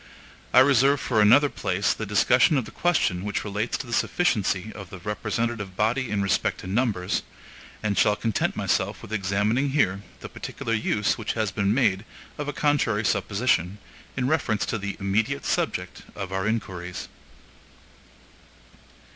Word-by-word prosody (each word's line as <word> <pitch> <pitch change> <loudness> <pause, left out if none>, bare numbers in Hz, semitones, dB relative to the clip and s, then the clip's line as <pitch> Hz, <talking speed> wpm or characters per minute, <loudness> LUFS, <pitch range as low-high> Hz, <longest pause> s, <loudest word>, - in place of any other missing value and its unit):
I 130 - +7
reserve 140 +1 +4
for 110 -4 +1
another 120 +8 +6
place 95 -6 0
the 110 - -5
discussion 125 - +4
of 130 - -1
the - - -10
question 140 - +1
which 105 0 -2
relates 105 +2 -2
to - - -6
the 120 - -7
sufficiency 110 - +1
of 100 -4 -9
the 95 - -9
representative 105 +1 -3
body 120 +4 +1
in 100 -1 0
respect 95 - 0
to - - -10
numbers, 100 -3 0 0.6
and 105 -2 0
shall 105 - +3
content 110 -2 -1
myself - - -1
with 110 - -8
examining 105 +7 +1
here 100 -9 +1 0.2
the - - -6
particular 115 - -5
use 105 +1 0
which 110 - -2
has 110 -3 -1
been 100 0 0
made 105 -5 +2 0.4
of 145 - -3
a - - -1
contrary 130 -9 +1
supposition, 100 -5 +1 0.4
in 125 -1 0
reference 135 -8 +1
to 110 - -2
the 100 0 -4
immediate 110 +8 0
subject - - -2
of 95 -2 -5
our 95 +2 -1
inquiries. 95 -5 -4
105 Hz, 155 wpm, -25 LUFS, 100-125 Hz, 0.6 s, I